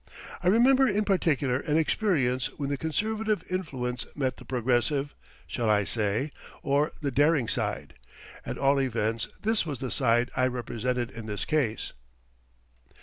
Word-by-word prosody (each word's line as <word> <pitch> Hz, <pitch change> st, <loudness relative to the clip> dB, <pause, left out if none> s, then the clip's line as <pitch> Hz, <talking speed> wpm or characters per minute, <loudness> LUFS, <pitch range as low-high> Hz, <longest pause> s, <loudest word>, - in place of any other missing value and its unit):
I 180 Hz, -, -1 dB
remember 260 Hz, +6 st, +5 dB
in 210 Hz, -1 st, +1 dB
particular 145 Hz, -10 st, +1 dB
an 150 Hz, 0 st, 0 dB
experience 140 Hz, -, +1 dB
when 140 Hz, -2 st, -2 dB
the -, -, +1 dB
conservative 215 Hz, +7 st, -1 dB
influence 130 Hz, -9 st, -2 dB
met 135 Hz, -3 st, -1 dB
the -, -, -13 dB
progressive 130 Hz, +3 st, 0 dB, 0.3 s
shall 115 Hz, -3 st, -1 dB
I 105 Hz, -1 st, +4 dB
say? 110 Hz, +7 st, -1 dB, 0.3 s
or 145 Hz, +2 st, +2 dB
the 140 Hz, -2 st, -1 dB
daring 145 Hz, -2 st, +3 dB
side. -, -, -2 dB, 0.5 s
At -, -, -5 dB
all 140 Hz, 0 st, +3 dB
events, 115 Hz, -3 st, -1 dB, 0.2 s
this 220 Hz, +1 st, +2 dB
was 150 Hz, -5 st, -4 dB
the 130 Hz, -1 st, -4 dB
side 120 Hz, +1 st, +2 dB
I 130 Hz, 0 st, +3 dB
represented 125 Hz, 0 st, -2 dB
in 115 Hz, -1 st, -8 dB
this 105 Hz, -1 st, -3 dB
case. 135 Hz, -8 st, -1 dB
135 Hz, 145 wpm, -28 LUFS, 120-160 Hz, 0.5 s, remember